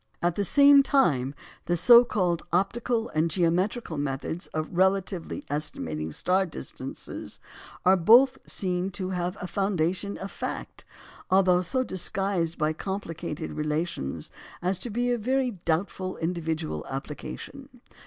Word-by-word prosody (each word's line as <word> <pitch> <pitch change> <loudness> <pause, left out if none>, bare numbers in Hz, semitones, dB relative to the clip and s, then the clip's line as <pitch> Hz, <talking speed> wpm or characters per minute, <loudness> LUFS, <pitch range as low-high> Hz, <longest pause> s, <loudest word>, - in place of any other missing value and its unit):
At 175 0 +1
the 200 - -1
same 280 +6 +7
time, 145 - +2 0.3
the 175 - +1
so 240 +7 +8
called 180 -8 0
"optical" 225 +6 0
and 155 +2 +1
"geometrical" 175 +2 0
methods 145 +4 -3
of 155 0 -3
relatively 190 - 0
estimating 80 - -3
star 185 - +1
distances 65 - -7 0.5
are 185 +1 +7
both 245 +9 +6
seen 185 -1 -1
to 185 +1 -3
have 180 +1 -2
a - - -5
foundation 190 0 -1
of 195 - -6
fact, - - -6 0.4
although 185 -1 +4
so 255 +9 0
disguised 185 -4 -2
by 155 0 +1
complicated 165 -4 -5
relations 150 - -3 0.3
as 180 +1 0
to 240 - -5
be 245 +3 0
of 240 -2 -1
very 260 +2 +1
doubtful 185 +3 -1
individual 160 - -2
application. 150 - -7
180 Hz, 130 wpm, -27 LUFS, 160-200 Hz, 0.5 s, so